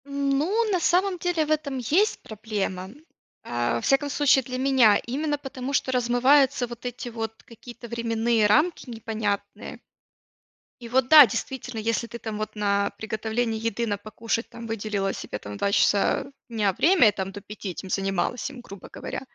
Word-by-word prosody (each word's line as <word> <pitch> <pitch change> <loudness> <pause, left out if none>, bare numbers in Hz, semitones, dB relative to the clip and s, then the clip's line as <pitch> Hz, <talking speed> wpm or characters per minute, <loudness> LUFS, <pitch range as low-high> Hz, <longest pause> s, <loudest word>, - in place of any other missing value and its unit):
Ну, 280 +11 0
на 370 - +2
самом 365 +3 +2
деле 340 -2 0
в 305 - -4
этом 300 -3 -1
есть 325 - +1
проблема. 205 -4 -4 0.5
А, 120 0 -1
во 115 - -2
всяком 275 +1 +2
случае 280 -2 +3
для 255 +1 -5
меня, 255 -6 +5
именно 290 +4 -1
потому, 270 -1 -6
что 265 - +1
размываются 255 +2 +3
вот 240 +1 -10
эти 245 0 -5
вот 225 -1 -4
какие-то 240 +1 -12
временные 230 -1 +1
рамки 290 +7 +2
непонятные. 215 -2 -4 1.0
И 235 - -8
вот 255 +1 +2
да, 300 -4 +10
действительно, 245 +1 -5
если 230 +1 -1
ты 235 - -8
там 220 -2 -6
вот 215 - -4
на 200 -1 +1
приготовление 220 +1 -2
еды, 230 +1 -1
на 205 -2 -1
покушать 225 +2 -3
там 235 -1 -9
выделила 210 -3 -2
себе - - -6
там 105 0 -8
2 200 - 0
часа 205 +7 +2 0.2
дня 210 -4 0
время 325 - +5
и - - -1
там 190 -1 -4
до 205 - -8
5 205 0 -8
этим 185 +1 -7
занималась 195 +7 -1
им, 265 -3 -10
грубо 200 -5 -12
говоря, - - -6
235 Hz, 170 wpm, -25 LUFS, 210-270 Hz, 1.0 s, да